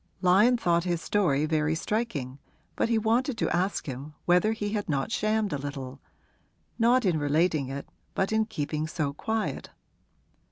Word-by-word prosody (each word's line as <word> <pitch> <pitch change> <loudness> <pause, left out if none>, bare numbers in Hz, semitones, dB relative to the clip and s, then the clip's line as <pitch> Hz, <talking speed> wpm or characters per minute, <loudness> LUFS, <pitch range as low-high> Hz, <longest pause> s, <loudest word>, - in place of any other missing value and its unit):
Lyon 205 +7 +5
thought 170 -6 +2
his 175 -2 -1
story 160 -7 +1
very 155 0 +1
striking, 160 - -3 0.4
but - - 0
he 230 - +3
wanted 230 +3 +1
to 220 - 0
ask 185 +3 0
him 140 +3 -7
whether 180 +5 +4
he 210 -2 -2
had 205 -3 -3
not 145 +8 -1
shammed 215 -3 0
a 145 - -2
little 135 -1 -6 0.8
not 240 +1 +4
in 170 -5 +2
relating 150 0 +1
it, 135 +1 -6 0.3
but 195 - 0
in 220 0 +2
keeping 155 -6 -3
so 155 -3 -2
quiet. 220 +8 -3
175 Hz, 160 wpm, -27 LUFS, 145-220 Hz, 0.8 s, Lyon